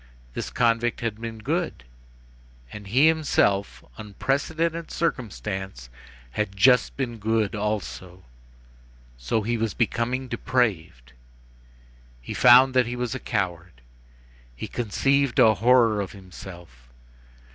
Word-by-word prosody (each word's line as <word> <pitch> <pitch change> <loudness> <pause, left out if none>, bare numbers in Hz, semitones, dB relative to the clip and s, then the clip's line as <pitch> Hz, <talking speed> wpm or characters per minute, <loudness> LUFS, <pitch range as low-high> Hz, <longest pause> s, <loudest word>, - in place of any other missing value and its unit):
This - - -4
convict 120 0 +1
had 115 -2 -3
been 115 -1 -6
good. 110 - -3 0.9
And 105 -2 -9
he 130 +9 +4
himself, 100 - +1
unprecedented 160 +10 -2
circumstance, 95 - -4 0.4
had 100 +7 -3
just 125 +3 +4
been 120 -4 -3
good 110 -1 0
also. 100 -4 -4 1.0
So 105 - -1
he 120 +2 -1
was 110 -2 -2
becoming 120 +2 -1
depraved. 90 - -2 1.1
He - - -7
found 125 +2 +7
that 125 -2 +3
he 120 - -4
was 125 -2 -3
a 130 - -4
coward. 90 - -3 0.8
He - - -6
conceived 135 +4 0
a 115 -4 +6
horror 115 0 +3
of 100 - -6
himself. 85 - -13
110 Hz, 115 wpm, -24 LUFS, 95-125 Hz, 1.1 s, found